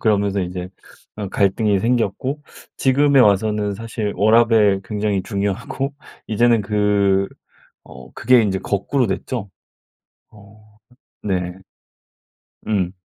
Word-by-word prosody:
그러면서 100 -2 +1
이제 90 0 -5 0.5
어 100 -3 -4
갈등이 100 +1 +1
생겼고. 125 +5 -1 0.4
지금에 140 +1 +4
와서는 105 -1 +2
사실 110 -1 -4
워라밸 110 -1 +4
굉장히 105 -2 -1
중요하고. 110 +8 -3 0.3
이제는 115 0 +2
그 100 -1 +1 0.6
어 - - -13
그게 125 -2 +4
이제 95 -3 -1
거꾸로 110 +5 -1
됐죠. 100 +2 -4 0.8
어. 105 +1 -19 0.4
네. 90 -3 -2 1.1
음. 95 -4 0
105 Hz, 220 characters per minute, -20 LUFS, 100-115 Hz, 1.1 s, 지금에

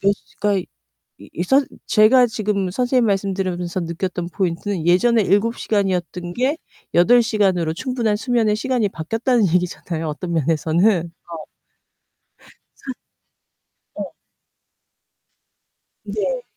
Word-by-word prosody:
몇 200 +1 +3
시 205 - -14
그러니까 205 -2 +2
이 - - -31 0.7
이 175 - -2
선 270 +9 +3 0.2
제가 240 +4 +5
지금 210 -4 -2
선생님 250 +3 +1
말씀 195 -2 0
들으면서 180 -2 -2
느꼈던 170 +1 -4
포인트는 185 -1 -2
예전에 225 +7 +4
7 205 +4 +2
시간이었던 180 -4 -1
게 260 - 0 0.4
8 235 +8 +6
시간으로 195 -8 +1
충분한 230 +2 -1
수면의 225 -1 +1
시간이 235 -2 0
바뀌었다는 225 - 0
얘기잖아요, 170 -1 -2
어떤 170 +3 -4
면에서는 165 +5 +2 0.3
어. 160 -2 -6 1.4
산 265 - -7 1.0
네. - - -5 1.9
네. - - -2
200 Hz, 255 characters per minute, -20 LUFS, 175-230 Hz, 1.9 s, 8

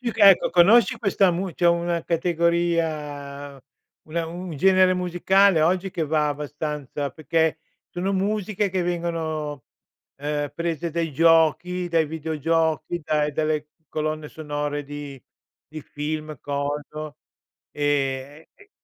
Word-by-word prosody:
più 240 -2 -2
che 205 -3 +8
ecco, 185 - +2
conosci 205 +7 +5
questa 195 -2 +3
mu 180 +1 -3
c'è 175 - +1
una 170 0 +1
categoria, 160 -5 -1 0.5
una 165 +1 -2
un 175 +2 -7
genere 185 +2 +4
musicale 180 0 +3
oggi 185 +3 +1
che 165 - -1
va 155 0 +1
abbastanza, 145 -1 -4
perché 160 +2 0 0.3
sono 185 +3 -2
musiche 205 +1 0
che 185 -1 -1
vengono, 160 -5 -3 0.5
ehm, 145 0 -2
prese 170 0 -2
dai 165 -1 -2
giochi, 165 +3 +3
dai 165 -2 +2
videogiochi, 160 +2 -1
dai 150 -1 +1
dalle 155 0 -1 0.2
colonne 155 0 -3
sonore 145 -1 -4
di 145 -2 -8 0.5
di 155 0 -8
film, 155 0 -5
coso, 145 +1 -4 0.5
ehm, 145 0 -1
che 410 0 -20
160 Hz, 120 wpm, -24 LUFS, 150-175 Hz, 0.5 s, che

